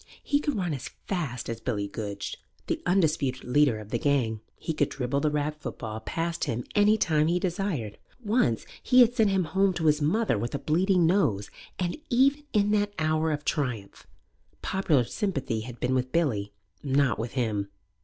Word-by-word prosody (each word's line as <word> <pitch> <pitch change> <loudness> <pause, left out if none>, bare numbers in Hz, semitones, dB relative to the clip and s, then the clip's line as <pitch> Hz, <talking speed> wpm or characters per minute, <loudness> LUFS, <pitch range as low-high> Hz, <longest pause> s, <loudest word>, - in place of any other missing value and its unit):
He 285 - +2
could 295 -2 -1
run 180 -5 -1
as 135 -1 -5 0.2
fast 155 -11 -3
as 115 0 -5
Billy 100 -3 -2
Goodge, 100 -1 -5 0.3
the - - -2
undisputed 155 -8 +1
leader 135 -2 +3
of 105 -1 -9
the 120 - 0
gang; 120 -7 +1 0.2
he 160 - -3
could 145 -2 +1
dribble 135 +1 -1
the 150 +1 +1
rag 150 0 -1
football 110 -6 -5
past 165 +8 -2
him 120 +2 -2
any 210 +1 +4
time 155 -6 +2
he 175 +2 +2
desired; 175 - -2 0.3
once 205 - +1 0.2
he 255 0 +5
had 240 0 +5
sent 220 -4 +3
him 190 -1 +2
home 190 +4 +2
to 165 - -2
his 150 0 +3
mother 170 - +1
with 120 +5 -3
a - - +1
bleeding 180 +4 +2
nose, 120 - +1 0.3
and, 175 -1 -1
even 275 +4 +3
in 210 -1 +2
that 205 -1 +1
hour 155 0 +1
of 150 0 -3
triumph, 125 -10 -3 0.6
popular 165 -9 +2
sympathy 140 - -2
had 120 +2 -8
been 125 +1 0
with 130 0 0
Billy, 115 -12 0 0.3
not 140 -4 +1
with 115 +1 -4
him. 110 -6 -1
150 Hz, 185 wpm, -27 LUFS, 120-190 Hz, 0.6 s, he